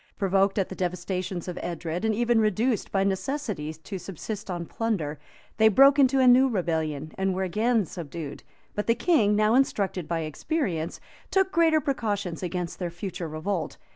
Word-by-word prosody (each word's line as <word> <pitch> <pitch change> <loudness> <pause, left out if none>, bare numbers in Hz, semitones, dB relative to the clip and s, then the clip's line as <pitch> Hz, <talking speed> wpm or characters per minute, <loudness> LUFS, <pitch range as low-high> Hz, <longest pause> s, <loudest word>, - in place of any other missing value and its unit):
Provoked 195 0 +2
at 195 - +1
the - - -5
devastations 180 0 -3
of 180 - -5
Edred, 170 +1 -4
and 220 -1 +1
even 235 0 +3
reduced 215 +2 0
by 195 -1 +2
necessity 195 - -2
to 160 +5 -8
subsist 200 +4 -6
on 175 -2 -3
plunder, 165 -10 -2 0.4
they 220 0 +6
broke 275 +6 +6
into 270 0 +5
a 260 - +5
new 255 +2 +6
rebellion, 160 - -2
and 190 -1 +1
were 190 - -1
again 215 +4 +1
subdued; 160 -3 -7 0.3
but 210 - -3
the 230 - +4
king, 235 - +3
now 215 +1 +3
instructed 200 - +1
by 170 -1 -1
experience, 165 - -2 0.3
took 385 -1 +2
greater 325 -3 +4
precautions 205 - -2
against 180 -1 -4
their 180 -2 -2
future 175 0 -5
revolt. 160 +4 -3
195 Hz, 170 wpm, -26 LUFS, 170-230 Hz, 0.4 s, they